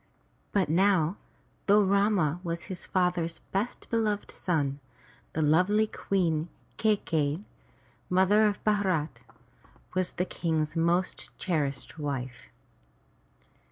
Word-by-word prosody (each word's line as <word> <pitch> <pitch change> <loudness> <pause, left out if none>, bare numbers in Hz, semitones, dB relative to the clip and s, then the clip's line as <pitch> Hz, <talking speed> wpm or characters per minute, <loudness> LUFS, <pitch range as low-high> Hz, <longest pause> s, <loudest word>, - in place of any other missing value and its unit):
But 195 -5 +2
now, 180 +1 +3 0.5
though 205 +1 +6
Rama 195 -5 +2
was 170 -1 -3
his 185 -3 -4
father's 175 -3 0
best 205 +5 -2
beloved 215 -3 0
son, 145 -6 -1 0.5
the 160 - 0
lovely 180 +8 +4
Queen 175 -6 -1 0.3
Kai 215 -1 +4
key'i, 155 -2 -1 0.7
mother 190 +4 +4
of 205 -1 -3
Bharat, 190 -8 0 0.7
was 185 -1 0
the 180 - -1
King's 160 -3 -1
most 170 +2 0
cherished 150 -4 -2
wife. 130 -4 -4
180 Hz, 105 wpm, -28 LUFS, 155-200 Hz, 0.7 s, though